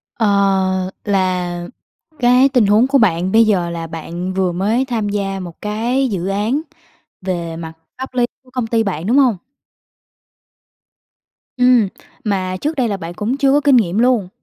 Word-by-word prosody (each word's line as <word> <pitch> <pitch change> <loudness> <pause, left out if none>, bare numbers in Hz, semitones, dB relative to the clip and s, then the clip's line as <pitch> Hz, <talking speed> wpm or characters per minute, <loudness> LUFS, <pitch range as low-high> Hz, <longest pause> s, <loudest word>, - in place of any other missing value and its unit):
Ờ, 190 -3 +1
là 180 -3 -1 0.5
cái 250 +2 +5
tình 250 -5 +3
huống 215 +5 +4
của 275 0 +3
bạn 185 -5 +2
bây 225 0 +5
giờ 180 -5 +1
là 165 -1 -5
bạn 170 +3 -5
vừa 185 -2 0
mới 215 +9 0
tham 225 -5 -2
gia 195 -1 -2
một 175 -3 -9
cái 235 +5 0
dự 190 -2 -3
án 215 +9 0 0.6
về 170 -3 -3
mặt 160 -1 -7 0.3
pháp 260 -1 -7
lý 245 -1 +2 0.2
của 255 - -22
công 250 -3 -2
ty 225 0 +1
bạn, 180 -4 -3
đúng 255 +5 +3
hông? 250 -7 +4 2.2
Ừm, 250 -4 +4 0.4
mà 185 -3 -1
trước 310 +2 -1
đây 250 -4 +1
là 200 -2 -2
bạn 170 0 -7
cũng 225 +8 -2
chưa 275 -1 +3
có 290 +1 +3
kinh 280 -2 +4
nghiệm 200 -1 +1
luôn. 240 -7 +2
205 Hz, 170 wpm, -18 LUFS, 185-245 Hz, 2.2 s, cái